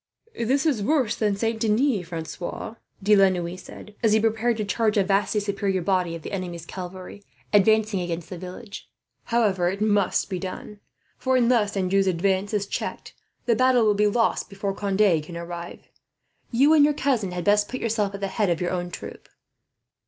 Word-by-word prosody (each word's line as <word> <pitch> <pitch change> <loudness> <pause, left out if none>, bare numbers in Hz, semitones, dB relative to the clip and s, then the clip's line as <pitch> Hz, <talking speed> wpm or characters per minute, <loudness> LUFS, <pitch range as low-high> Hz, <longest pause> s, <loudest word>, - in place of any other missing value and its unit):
"This 265 +6 0
is 275 -9 +1
worse 260 0 +1
than 210 -2 0
Saint 225 +2 -1
Denis, 220 -3 +1
Francois," 170 +5 -6 0.3
De 210 +2 +5
la 195 -1 +6
Noue 175 -1 -3
said, 205 +2 -12
as 220 -3 +3
he 220 - +5
prepared 225 +1 +1
to 215 - -2
charge 215 +1 +1
a 200 - +4
vastly 200 +2 +1
superior 200 -2 -1
body 180 -3 0
of 165 - -9
the - - -7
enemy's 175 -4 -5
cavalry, 185 +2 -8 0.3
advancing 215 0 +4
against 170 -1 -5
the 180 - -5
village. 185 +4 -9 0.4
"However, 200 -7 +2
it 195 +2 -4
must 205 -3 +1
be 185 -2 -4
done; 195 +2 -7 0.4
for 260 0 +1
unless 235 -5 +2
Anjou's 195 +1 +2
advance 190 +2 +1
is 205 -2 0
checked, - - -5 0.3
the 235 - +3
battle 255 -1 +4
will 210 - +4
be 210 +1 +2
lost 225 +2 +1
before 195 -1 -3
Conde 195 -4 +2
can 170 +3 -9
arrive. 170 0 -8 0.6
You 275 +6 +4
and 305 -2 +6
your 295 0 +3
cousin 250 -10 0
had 180 -1 -4
best 205 +2 +3
put 255 - -4
yourself 210 -3 -1
at 200 - -8
the 195 - 0
head 200 0 0
of 170 -2 0
your 180 - -1
own 175 -1 -2
troop." - - -9
200 Hz, 190 wpm, -24 LUFS, 185-220 Hz, 0.6 s, la